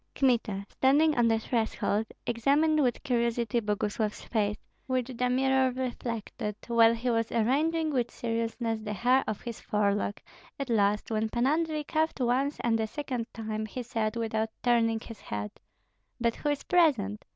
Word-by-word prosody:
Kmita, 230 -7 +1
standing 295 +7 +3
on 240 -2 +3
the 225 -1 +3
threshold, 220 -1 -1 0.2
examined 290 +6 +2
with 245 -3 0
curiosity 235 -3 +1
Boguslav's 210 0 -2
face, 210 -2 0 0.3
which 255 -1 -1
the 250 +1 0
mirror 265 +1 +3
reflected, 235 -4 -4
while 230 -1 +5
he 240 +2 -1
was 230 -1 0
arranging 305 +8 +1
with 245 -3 +1
seriousness 230 -1 -2
the 210 -1 -4
hair 250 +6 +3
of 215 - -3
his 235 -2 -6
forelock; 205 -1 0 0.4
at 275 -3 -3
last, 210 0 +2
when 220 0 0
Pan 240 +2 0
Andrei 310 +1 +1
coughed 315 +1 -1
once 260 +4 +1
and 225 -1 +1
a 220 - 0
second 250 -3 -4
time, 215 -1 -4
he 250 +4 -5
said, 225 -2 -2
without 225 -1 -1
turning 230 -2 +3
his 230 -1 -11
head, 105 0 -4 0.7
"But 235 -1 0
who 295 - -1
is 290 -1 -1
present? 255 - +2
235 Hz, 160 wpm, -29 LUFS, 220-260 Hz, 0.7 s, while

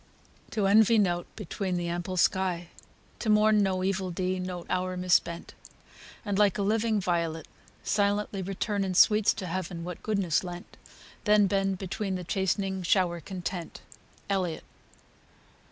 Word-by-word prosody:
To 210 -3 -1
envy 220 +3 +5
nought 175 -4 +1
beneath 190 -2 -3
the 175 0 -2
ample 175 +2 -3
sky; 180 -2 +1 0.5
To 220 - -2
mourn 215 0 +5
no 190 -2 0
evil 190 -1 -1
deed, 185 +1 -2
no 180 -1 -5
hour 185 0 -1
mis 180 0 0
spent; 170 0 +1 0.7
And, 205 -1 -1
like 205 -3 +4
a 200 - 0
living 215 +1 +1
violet, 170 -4 -1 0.4
silently 205 -1 0
Return 195 +2 -2
in 185 -1 -2
sweets 210 +2 +5
to 190 - -5
Heaven 180 -1 -4
what 180 0 -7
goodness 195 -6 0
lent, 175 -1 -8 0.5
Then 210 -1 +5
bend 195 0 0
beneath 190 +1 -3
the 180 - -6
chastening 190 +1 -1
shower 175 -1 +2
content. 180 0 -6 0.5
ELLIOTT. 185 -5 -1
190 Hz, 145 wpm, -28 LUFS, 180-205 Hz, 0.7 s, envy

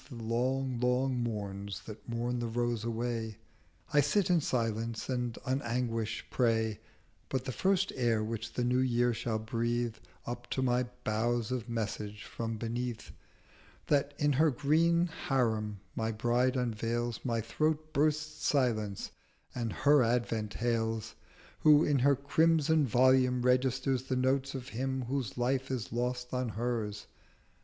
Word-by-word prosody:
The 130 - -8
long, 125 +3 -1
long 125 +1 +1
Morns 100 -3 -4
that 110 +2 -10
mourn 120 +1 -1
the 120 - -2
Rose 120 -1 -1
away 115 -1 -2 0.6
I 145 - +6
sit 185 +6 +2
in 170 -2 +4
silence, 115 -3 -1
and 125 -2 -1
on 130 +1 0
Anguish 115 -3 -2
prey: 110 -3 +1 0.5
But 130 -1 -2
the 130 - -2
first 190 +6 +1
Air 115 -4 +1
which 110 0 -4
the 125 - -1
New 125 +1 +2
Year 120 -1 +2
shall 115 -1 -2
breathe 115 +1 -1 0.3
210 120 - -2
Up 120 0 -12
to 130 - -1
my 125 0 +2 0.2
Boughs 115 +2 0
of 125 -2 -3
Message 105 -2 -3
from 115 -1 -4
beneath 120 +1 -4 0.7
That 145 0 +1
in 145 -1 +2
her 155 +4 +4
green 160 +5 +3 0.2
Harim 110 -6 +1 0.2
my 110 0 -1
Bride 120 +4 +1
unveils, 120 -1 -1
My 115 -3 0
Throat 155 +7 -1
bursts 155 +1 0
silence 110 -8 0 0.4
and 115 -3 -2
her 145 +4 +4
Advent 115 -3 0
hails, 115 -2 -1 0.5
Who 150 0 +6
in 145 -2 +2
her 140 +2 +4
crimson 155 +1 +3
Volume 125 +1 +4
registers 130 +1 +2
The 130 - -1
Notes 135 +2 +1
of 130 0 -6
Him 130 +2 -2
whose 125 -4 -3
Life 130 +2 0
is 125 -4 -3
lost 125 +1 -2
in 125 -1 0
hers. 110 -2 -2
120 Hz, 150 wpm, -31 LUFS, 115-130 Hz, 0.7 s, I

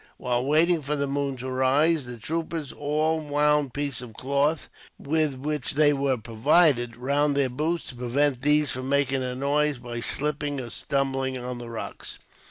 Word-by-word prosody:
While 125 -1 -1
waiting 160 +3 +3
for 145 +1 -2
the 140 -1 -1
moon 140 -1 -2
to 130 +1 -5
rise, 140 +4 +2
the 120 -1 -7
troopers 160 +3 -4
all 155 +2 0
wound 150 -2 +1
pieces 140 -3 -2
of 115 -3 -10
cloth, 140 +3 0 0.3
with 155 -1 0
which 145 0 -3
they 150 0 +5
had 145 - +1
come 135 -4 0
provided, 120 0 +3
round 140 +3 +1
their 135 -2 +2
boots, 160 +6 -1
to 130 - -8
prevent 125 +2 0
these 150 0 +3
from 130 +1 -4
making 135 -1 +2
a 125 -1 -3
noise, 145 +2 +1
by 120 -1 -6
slipping 145 +2 0
or 120 -3 -6
stumbling 135 -1 -1
on 125 0 -5
the 120 -1 -8
rocks. 115 - -7
140 Hz, 180 wpm, -26 LUFS, 130-150 Hz, 0.3 s, they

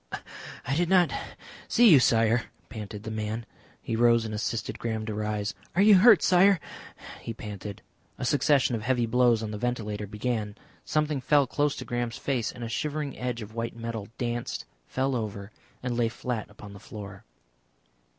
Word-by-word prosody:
"I 135 - 0
did 170 +2 +1
not 180 -3 +5 0.6
see 240 0 +5
you, 145 - +9
Sire," 115 -1 +3 0.2
panted 105 -2 -7
the 110 - -5
man. 110 +1 -3 0.4
He 115 - -2
rose 115 0 +4
and 110 - -4
assisted 110 +1 -3
Graham 110 -2 -2
to 110 - -3
rise. 105 0 -2 0.2
"Are 190 - +4
you 205 -3 +8
hurt, 215 -3 +7
Sire?" 185 +1 +5 0.6
he 115 - -6
panted. 105 -2 -7 0.3
A - - -3
succession 140 -1 +3
of 115 - -1
heavy 120 +1 +1
blows 120 -1 +3
on 105 - -4
the 105 - -5
ventilator 105 -4 -2
began, 105 0 -2 0.3
something 150 -2 0
fell 145 +2 +4
close 145 +3 0
to - - -7
Graham's 120 -2 -2
face, 125 -5 -1
and 120 - -9
a - - -3
shivering 150 +4 -3
edge 125 -2 -3
of 105 +1 -11
white 115 0 -3
metal 115 -3 -5
danced, 120 -1 -3 0.2
fell 130 0 0
over, 105 -3 -4 0.3
and 125 -1 -1
lay 120 -1 +2
fiat 120 -1 -4
upon 105 -1 -12
the 100 - -11
floor. 100 -1 -9
115 Hz, 175 wpm, -27 LUFS, 110-130 Hz, 0.6 s, you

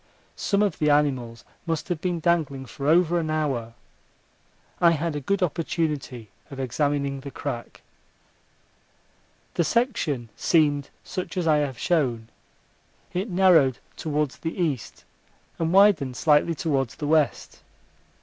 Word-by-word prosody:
Some 200 0 +1
of 200 -5 -1
the 150 - +2
animals 130 -6 +1 0.2
must 165 -2 -2
have 170 -3 -2
been 175 -2 -1
dangling 155 -5 0
for 140 +2 -6
over 170 +2 +4
an 160 -2 -3
hour. 135 -7 -2 1.0
I 170 - +6
had 165 0 -2
a - - -1
good 195 +7 0
opportunity 150 - -2 0.2
of 135 - -9
examining 140 +1 -1
the 140 +1 -8
crack. 120 -2 -6 1.7
The 170 - +1
section 160 - 0
seemed 145 -4 +2
such 185 +1 -5
as 180 - 0
I 155 -2 +4
have 140 -4 -1
shown. 120 -9 0 0.8
It 190 +5 -2
narrowed 175 -9 +4 0.2
towards 150 -3 -2
the 160 - -4
east 150 -9 -3 0.5
and 165 0 0
widened 180 -10 +4
slightly 155 +2 +3
towards 135 -8 -1
the 150 - -5
west. 155 -1 0
150 Hz, 130 wpm, -25 LUFS, 135-170 Hz, 1.7 s, I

